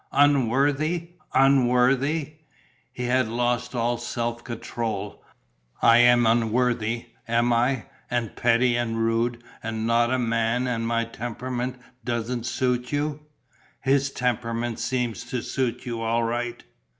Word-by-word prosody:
"Unworthy? 145 +5 +2 0.2
Unworthy?" 135 +3 +3 0.5
He 125 - -6
had 125 0 +2
lost 120 +2 -1
all 120 0 0
self 120 0 -3
control. 115 -3 -4 0.6
"I 115 0 +6
am 120 0 +6
unworthy, 115 0 +1 0.2
am 120 +1 +2
I, 120 +1 +1 0.3
and 120 -3 -2
petty 120 +1 +3
and 120 -1 -1
rude 115 +1 0 0.2
and 110 0 -3
not 120 +1 +3
a 130 - +2
man 115 0 0
and 115 -2 -1
my 115 0 +1
temperament 125 +2 -4 0.2
doesn't 120 0 -2
suit 125 0 -1
you? 145 0 -1 0.6
His 135 +1 +2
temperament 120 -2 -2
seems 120 -1 -2
to 125 -1 -3
suit 130 -1 -2
you 115 -2 -4
all 115 +1 +1
right! 120 +1 -3
120 Hz, 125 wpm, -25 LUFS, 115-125 Hz, 0.6 s, I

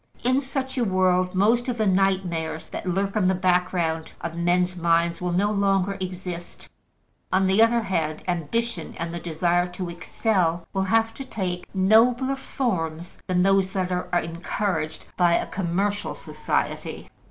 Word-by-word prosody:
In 255 +3 +3
such 265 -1 -3
a - - +3
world, 185 -2 +2
most 230 +6 +3
of 240 - -2
the 220 - +1
nightmares 185 -5 0
that - - -6
lurk 195 +3 -1
in 205 -4 +3
the 190 - +3
background 180 -3 0
of 165 - -4
men's 180 +1 +1
minds 170 0 +1
will 180 0 -1
no 200 +4 +2
longer 195 -1 +1
exist; 180 -2 -6 0.6
on 190 +1 +3
the 190 +3 +4
other 230 +1 +4
hand, 160 -6 -2
ambition 180 +3 -2
and 170 0 -4
the 170 - -3
desire 175 +2 +1
to 180 0 -5
excel 175 -2 0
will 190 -1 0
have 225 +3 +2
to 270 - -7
take 185 -8 -4
nobler 235 +7 +4
forms 175 - -3
than 180 -1 +2
those 195 -1 +3
that 185 -2 -1
are 180 0 -2
encouraged 165 -1 -3
by 175 -2 +4
a - - +1
commercial 195 +3 -1
society. - - -3
185 Hz, 155 wpm, -24 LUFS, 175-205 Hz, 0.6 s, the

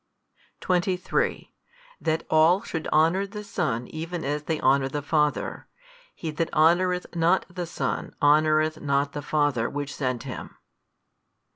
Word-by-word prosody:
23 180 0 -1 0.5
That 160 0 -1
all 165 +6 +4
should 160 -8 -4
honour 165 +6 +3
the 210 +1 -7
Son 155 - -2
even 165 +1 -5
as 145 +1 -1
they 160 -1 -1
honour 135 +1 +3
the 145 +1 -4
Father: 150 0 0 0.5
he 160 - -4
that 165 +2 -2
honoureth 180 +3 +2
not 170 +3 +3
the 180 -2 -4
Son 170 - -3
honoureth 155 +1 +3
not 140 0 +1
the 145 - -4
Father 145 -6 +1
Which 145 -1 -4
sent 125 -4 -2
Him. - - -8
155 Hz, 135 wpm, -25 LUFS, 145-175 Hz, 0.5 s, all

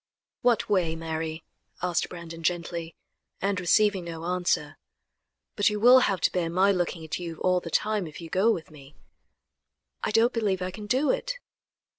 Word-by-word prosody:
"What 240 -2 +2
way, 180 -6 +1
Mary?" 160 0 -4 0.4
asked 175 -2 0
Brandon 170 -1 -8
gently, 170 -1 -2 0.4
and 200 -1 0
receiving 195 +1 +3
no 165 -1 -6
answer. 175 -4 -1 0.8
"But 205 - +3
you 210 0 -2
will 250 +4 +8
have 195 -7 +1
to - - +3
bear 175 -2 -1
my 185 +4 +3
looking 175 -3 -2
at 160 - -4
you 170 -2 -5
all 180 0 +3
the 170 - -8
time 210 +1 0
if 155 - -10
you 165 - -8
go 190 +6 +2
with 165 -7 -4
me." 145 -1 -15 1.1
"I - - 0
don't 225 +3 +3
believe 205 -5 0
I 185 - -3
can 210 +2 -8
do 260 +6 +2
it." - - -2
180 Hz, 175 wpm, -27 LUFS, 165-210 Hz, 1.1 s, will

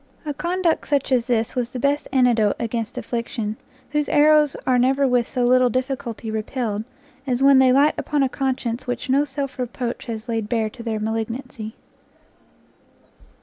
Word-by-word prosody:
A 295 - -2
conduct 345 +3 0
such 280 -2 0
as 245 -2 +2
this 230 -2 0
was 245 -2 -1
the 250 - -6
best 280 +3 0
antidote 240 -5 +3
against 230 -1 -3
affliction, 230 -2 -3 0.4
whose 295 0 0
arrows 300 -1 +4
are 250 -1 +3
never 270 +2 +3
with 245 -2 +1
so 250 - -1
little 255 0 +4
difficulty 245 -3 -3
repelled, 220 -1 -2 0.4
as 255 0 0
when 275 -1 +7
they 260 -1 +5
light 280 +4 +4
upon 295 -2 0
a - - +3
conscience 255 -2 -2
which 245 +1 -3
no 280 +2 +3
self 275 -1 -5
reproach 245 0 -4
has 225 0 -5
laid 225 -3 -2
bare 220 -2 0
to 245 - -11
their 225 -2 -2
malignancy. 225 +1 -4
250 Hz, 165 wpm, -22 LUFS, 230-275 Hz, 0.4 s, when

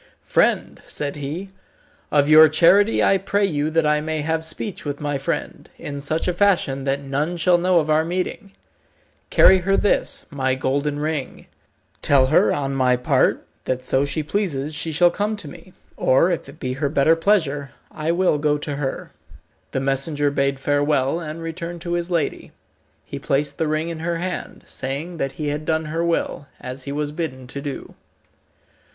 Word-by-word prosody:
"Friend," - - +1
said 145 -1 -4
he, 155 +7 -5 0.6
"of 145 -1 +3
your 155 +1 +8
charity 190 +7 +4
I 195 - +4
pray 200 +2 +1
you 150 -5 -1
that 160 0 +1
I 150 0 +2
may 155 0 -2
have 160 +1 -1
speech 160 +5 -4
with 145 -1 -4
my 145 -2 -2
friend, 135 - -4
in 140 -1 -6
such 155 +5 -1
a 180 - +1
fashion 170 -8 +1
that 140 +1 -1
none 145 +6 -2
shall 175 +1 +3
know 180 0 +3
of 155 - -1
our 155 +1 +3
meeting. 185 +4 -3 0.8
Carry 190 0 +6
her 195 +2 +1
this, 205 - 0
my 130 -2 0
golden 140 +3 -1
ring. 150 -2 -4 0.6
Tell 135 -2 +4
her, 130 - +4
on 140 -1 -1
my 130 -2 +3
part, 125 - +1 0.2
that 130 0 -2
so 130 +1 +2
she 145 +2 -2
pleases 155 -5 -2
she 160 +2 -3
shall 175 +3 +4
come 205 +4 -1
to 185 - -9
me, 185 +6 -12 0.3
or, 135 +8 +3
if 165 -5 -3
it - - -14
be 130 0 -3
her 140 +2 -1
better 155 +2 +4
pleasure, 160 -7 +1 0.2
I 155 +1 -2
will 175 -3 +2
go 150 0 +1
to 145 -1 -4
her." 135 -2 -4 0.6
The - - -1
messenger 140 +2 0
bade 140 -1 0
farewell, 145 +1 +1
and 165 0 -6
returned 170 +1 -6
to 175 0 -3
his 175 0 -2
lady. 165 -4 -2 0.5
He - - -7
placed 140 +1 -1
the 160 - +1
ring 155 +2 -1
in 165 -1 -5
her 170 +1 -2
hand, 180 +1 -5
saying 145 +7 -5
that 135 -3 -2
he 150 -2 -3
had 150 +1 -3
done 160 0 0
her 165 +2 -2
will, 165 -4 -1
as 130 +1 -7
he 140 - -4
was 145 0 -2
bidden 145 -5 -5
to 140 +3 -7
do. 140 -1 -6
150 Hz, 185 wpm, -22 LUFS, 140-170 Hz, 0.8 s, your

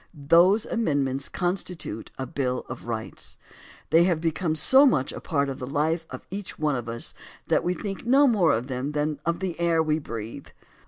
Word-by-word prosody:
Those 170 +9 +4
amendments 140 - -1
constitute 175 - -3
a 130 - -3
Bill 130 -4 -2
of 120 -1 -8
Rights. 110 -2 -5 0.5
They 165 +2 +6
have 175 -4 +1
become 165 0 -1
so 265 - +7
much 135 - +1
a - - -8
part 140 -2 0
of 135 -1 -5
the 125 - -5
life 160 +4 0
of - - -9
each 200 0 -6
one 150 -2 +1
of 120 -2 -4
us 115 0 -3 0.4
that - - +3
we 180 +1 0
think 195 0 -5
no 270 +4 +5
more 210 - +4
of 115 +2 0
them 130 +2 -4
than 150 0 -1
of 170 +1 0
the 180 -3 -3
air 170 -1 +2
we 155 0 +1
breathe. 115 -6 -7
155 Hz, 195 wpm, -25 LUFS, 135-180 Hz, 0.5 s, so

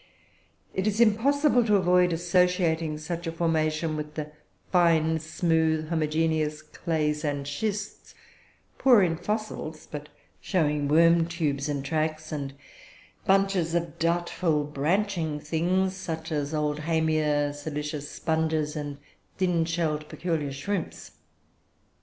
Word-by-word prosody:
"It 190 +2 -1
is 215 +1 0
impossible 245 +4 +4
to 210 -2 +4
avoid 180 -1 +4
associating 170 -2 +1
such 170 +2 -5
a - - -1
formation 160 -1 0
with 150 0 -5
the 150 -1 -5 0.4
fine, 160 -3 +3
smooth, 160 -1 0
homogeneous 155 -1 0
clays 150 -1 -2
and 145 -2 -2
schists, 205 +7 -4 0.6
poor 245 -7 +6
in 165 -2 +1
fossils, 180 -4 -4
but 150 0 -7 0.3
showing 150 -5 0
worm 165 +2 +5
tubes 150 -4 -1
and 140 -2 -2
tracks, 155 +1 -2
and 140 -3 -4 0.7
bunches 195 -4 +2
of 170 -1 -2
doubtful 170 -2 +1
branching 160 +2 -1
things, 180 +5 0
such 165 -3 -5
as 145 -1 -1
Oldhamia, 150 -1 +1
silicious 150 0 -5
sponges, 160 -1 -1
and 145 -2 -4 0.4
thin 180 -3 +2
shelled 160 -3 -1
peculiar 160 -5 -2
shrimps. 170 +7 -4
160 Hz, 115 wpm, -27 LUFS, 150-175 Hz, 0.7 s, poor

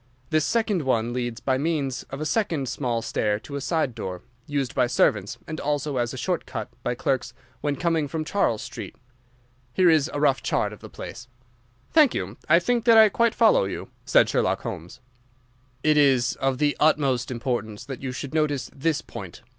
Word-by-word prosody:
This 155 -1 +3
second 220 -6 +1
one 120 -4 0
leads 120 -2 -3
by 130 -1 +1
means 140 -4 -1
of 135 - -6
a 155 - -3
second 160 - 0
small 120 -2 -2
stair 105 -2 0
to 140 - -8
a 140 - -3
side 155 -4 0
door, 95 -5 -6 0.2
used 140 -4 -2
by 125 - +2
servants, 105 -4 +1
and 155 - -6
also 145 -1 -1
as 120 -1 0
a - - -7
short - - -2
cut - - -5
by 120 - -2
clerks 125 -1 -1 0.3
when 145 -1 0
coming 165 -3 0
from 155 +2 -3
Charles 155 - 0
Street. - - -8 0.8
Here 180 +2 +5
is 155 -1 +3
a 145 - -3
rough 140 -2 +3
chart - - 0
of - - -12
the - - -11
place." 120 +2 -9
rough 130 +1 -36 0.4
chart - - -33
"Thank 305 -5 +5
you. 95 +4 -4
I 170 - +7
think 235 +6 0
that 230 -2 +7
I 220 -1 +8
quite 230 +2 +1
follow 225 - +5
you," 95 - -5
said - - +4
Sherlock - - 0
Holmes. 100 +10 -7 0.8
"It 155 -1 +4
is 130 -4 +4
of 135 -1 0
the 145 +1 +1
utmost 140 -5 +2
importance 120 -3 -3
that 135 -1 -7
you 135 -1 -3
should 135 +3 -6
notice 145 -5 0
this 150 +2 0
point. - - -9
140 Hz, 200 wpm, -25 LUFS, 120-155 Hz, 0.8 s, I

